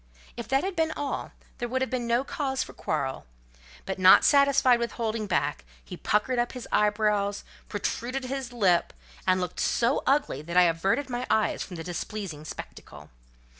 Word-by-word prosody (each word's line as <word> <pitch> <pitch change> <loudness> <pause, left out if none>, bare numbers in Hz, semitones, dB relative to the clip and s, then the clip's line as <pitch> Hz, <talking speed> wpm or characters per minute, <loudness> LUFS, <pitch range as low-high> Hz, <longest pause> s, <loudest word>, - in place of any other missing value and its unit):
If 235 - -6
that 270 +3 +2
had 380 0 -3
been 320 -1 +1
all, 290 -1 -4 0.3
there 240 - -2
would 260 +2 0
have 260 - -4
been 245 -2 -2
no 235 +2 +2
cause 270 -2 -2
for - - -12
quarrel; 135 - -3 0.6
but - - -4
not 185 0 +8
satisfied 280 -3 +5
with 235 0 -2
holding 220 -2 -2
back, 175 - -1 0.2
he - - -8
puckered 240 +4 0
up 240 - -1
his 250 -2 -7
eyebrows, 210 -1 +1 0.3
protruded 255 +3 -3
his 265 -1 -4
lip, 190 -8 +2 0.3
and 185 0 +4
looked 180 -1 -4
so 240 +4 +1
ugly 275 - +1
that 170 +3 -4
I 180 - +8
averted 175 - +1
my 245 0 -4
eyes 215 -1 +1
from 180 - -6
the 165 - -6
displeasing 175 -2 -5
spectacle. - - -10
235 Hz, 175 wpm, -27 LUFS, 185-260 Hz, 0.6 s, not